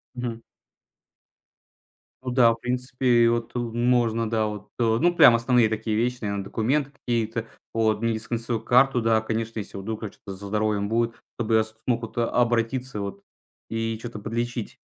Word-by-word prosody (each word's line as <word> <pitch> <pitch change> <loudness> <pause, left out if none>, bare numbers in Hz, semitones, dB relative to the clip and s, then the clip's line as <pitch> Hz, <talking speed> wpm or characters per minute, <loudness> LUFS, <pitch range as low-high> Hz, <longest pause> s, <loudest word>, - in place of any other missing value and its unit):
Мгм. 120 -2 -4 1.8
Ну 130 - -3
да, 120 -2 +5
в - - -9
принципе, 125 -1 +2
вот, 115 -1 -1
э, - - 0
можно, 120 -1 +1
да. 110 -1 +1
Вот, 105 0 -5
э, - - +3 0.2
ну, 175 0 +3
прям 120 - +8
основные 120 -1 +3
такие 110 0 -2
вещи, 125 +1 0
наверно, 100 -2 -2
документы 135 +8 0
какие-то, 115 -4 -2 0.3
вот 110 -1 +1
медицинскую 115 0 -1
карту, 125 +1 +4
да, 110 0 +3
конечно. 115 0 -3
Если 100 - -7
вдруг 110 +3 -5
там 105 - -5
что-то 95 -1 -10
со 100 +1 -8
здоровьем 105 -1 0
будет, 115 +1 0 0.2
чтобы 115 -1 0
я 110 - +5
смог 110 +2 -3
вот 115 - -8
обратиться, 120 0 0
вот, 100 0 -5 0.5
и 115 0 -2
чё-то 115 -2 -7
подлечить. 115 +1 -3
115 Hz, 160 wpm, -25 LUFS, 110-120 Hz, 1.8 s, прям